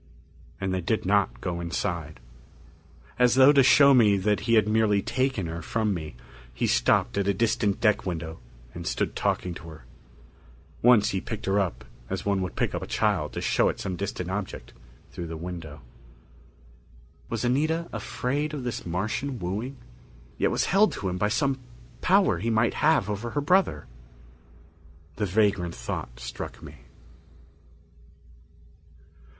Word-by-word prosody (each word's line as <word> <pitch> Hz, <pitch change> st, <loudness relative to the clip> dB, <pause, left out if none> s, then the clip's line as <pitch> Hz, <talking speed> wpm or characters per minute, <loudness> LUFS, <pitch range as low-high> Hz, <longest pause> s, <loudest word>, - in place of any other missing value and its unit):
And 95 Hz, -1 st, -2 dB
they 95 Hz, -, -1 dB
did 105 Hz, +5 st, -1 dB
not 100 Hz, +1 st, +1 dB
go 85 Hz, -2 st, -3 dB
inside. 85 Hz, -4 st, -3 dB, 1.0 s
As 125 Hz, -1 st, +4 dB
though 135 Hz, +2 st, +8 dB
to 140 Hz, -2 st, +5 dB
show 140 Hz, +2 st, +7 dB
me 105 Hz, -6 st, +5 dB
that 105 Hz, +2 st, +1 dB
he 115 Hz, -, +5 dB
had 105 Hz, -2 st, +4 dB
merely 105 Hz, -2 st, +2 dB
taken 130 Hz, -7 st, -1 dB
her 85 Hz, +1 st, -5 dB
from 110 Hz, +4 st, -1 dB
me, 80 Hz, -7 st, -6 dB, 0.4 s
he -, -, 0 dB
stopped -, -, +2 dB
at 100 Hz, -, 0 dB
a 100 Hz, -, +2 dB
distant 105 Hz, -2 st, +1 dB
deck 105 Hz, -2 st, +2 dB
window 80 Hz, -3 st, -5 dB, 0.3 s
and 85 Hz, -1 st, -7 dB
stood -, -, -1 dB
talking 90 Hz, -, -1 dB
to 85 Hz, -1 st, -10 dB
her. 75 Hz, -6 st, -13 dB, 1.0 s
Once 115 Hz, -3 st, +5 dB
he 95 Hz, -, -2 dB
picked 110 Hz, 0 st, -6 dB
her 95 Hz, +1 st, +2 dB
up 95 Hz, -4 st, -2 dB, 0.2 s
as -, -, -4 dB
one 100 Hz, -2 st, +1 dB
would 90 Hz, -2 st, -4 dB
pick -, -, -1 dB
up -, -, -3 dB
a -, -, -6 dB
child -, -, 0 dB
to -, -, -4 dB
show -, -, +2 dB
it -, -, -4 dB
some 95 Hz, -, -3 dB
distant 90 Hz, -1 st, -4 dB
object 100 Hz, -1 st, -5 dB, 0.4 s
through 85 Hz, -, -6 dB
the 80 Hz, 0 st, -6 dB
window. 80 Hz, -3 st, -7 dB, 1.5 s
Was 115 Hz, +1 st, -2 dB
Anita 155 Hz, +7 st, +1 dB
afraid 145 Hz, +4 st, -2 dB
of 135 Hz, -, -5 dB
this 120 Hz, -1 st, -4 dB
Martian's 110 Hz, +10 st, -2 dB
wooing? 105 Hz, +9 st, -4 dB, 0.6 s
Yet -, -, +1 dB
was -, -, 0 dB
held 205 Hz, +3 st, +3 dB
to 95 Hz, -, -3 dB
him 90 Hz, 0 st, -3 dB
by 105 Hz, -, +2 dB
some 135 Hz, +3 st, 0 dB, 0.4 s
power -, -, +3 dB
he 115 Hz, +5 st, -1 dB
might 115 Hz, +1 st, +2 dB
have 150 Hz, -9 st, +2 dB
over 105 Hz, +3 st, -3 dB
her 145 Hz, -, -2 dB
brother? 170 Hz, -, +2 dB, 1.3 s
The 105 Hz, -, 0 dB
vagrant 95 Hz, -3 st, +1 dB
thought -, -, -6 dB
struck -, -, -7 dB
me. -, -, -11 dB
100 Hz, 160 wpm, -26 LUFS, 90-120 Hz, 1.5 s, though